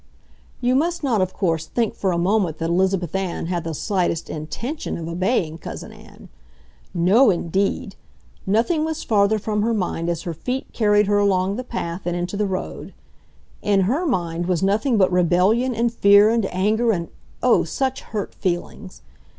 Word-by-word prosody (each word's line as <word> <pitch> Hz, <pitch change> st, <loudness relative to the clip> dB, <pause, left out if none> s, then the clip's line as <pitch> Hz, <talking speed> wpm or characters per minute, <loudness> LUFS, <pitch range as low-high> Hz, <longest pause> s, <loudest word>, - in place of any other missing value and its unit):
You 245 Hz, +1 st, +2 dB
must 335 Hz, +5 st, 0 dB
not, 235 Hz, -8 st, +2 dB
of 185 Hz, 0 st, 0 dB
course, 165 Hz, -5 st, -1 dB
think 230 Hz, -3 st, -1 dB
for 190 Hz, -, -1 dB
a 170 Hz, -, 0 dB
moment 180 Hz, -2 st, +1 dB
that 165 Hz, 0 st, -2 dB
Elizabeth 185 Hz, -1 st, +1 dB
Ann 190 Hz, -3 st, -2 dB
had 175 Hz, -1 st, -2 dB
the 165 Hz, -1 st, -4 dB
slightest 180 Hz, -3 st, -1 dB
INTENTION 235 Hz, -, -5 dB
of 165 Hz, -, -6 dB
obeying 170 Hz, -2 st, -1 dB
Cousin -, -, -8 dB
Ann. -, -, -15 dB, 0.6 s
No 190 Hz, +9 st, +4 dB
indeed! 195 Hz, +2 st, -1 dB, 0.5 s
Nothing 240 Hz, -, +2 dB
was 320 Hz, 0 st, -3 dB
farther 210 Hz, 0 st, +3 dB
from 210 Hz, 0 st, -2 dB
her 230 Hz, +2 st, +1 dB
mind 175 Hz, -4 st, -2 dB
as 170 Hz, -1 st, -2 dB
her 170 Hz, -, -4 dB
feet 250 Hz, -, -3 dB
carried 210 Hz, -2 st, +3 dB
her 205 Hz, +1 st, +2 dB
along 195 Hz, -1 st, +2 dB
the 250 Hz, -, -4 dB
path 175 Hz, -7 st, -5 dB
and 175 Hz, -, -1 dB
into 175 Hz, +3 st, -3 dB
the 210 Hz, 0 st, 0 dB
road. 185 Hz, -1 st, -5 dB, 0.7 s
In 200 Hz, -2 st, +2 dB
her 275 Hz, -, 0 dB
mind 175 Hz, -, -1 dB
was 180 Hz, -1 st, 0 dB
nothing 220 Hz, +5 st, +2 dB
but 190 Hz, -2 st, +3 dB
rebellion 185 Hz, +8 st, +2 dB
and 230 Hz, +1 st, 0 dB
fear 200 Hz, -1 st, +6 dB
and 225 Hz, -4 st, +1 dB
anger 215 Hz, +6 st, +2 dB
and 170 Hz, -5 st, -2 dB, 0.3 s
oh, -, -, +4 dB
such 265 Hz, -1 st, -2 dB
hurt 210 Hz, -3 st, -5 dB
feelings! 185 Hz, +2 st, -4 dB
195 Hz, 175 wpm, -22 LUFS, 175-225 Hz, 0.7 s, fear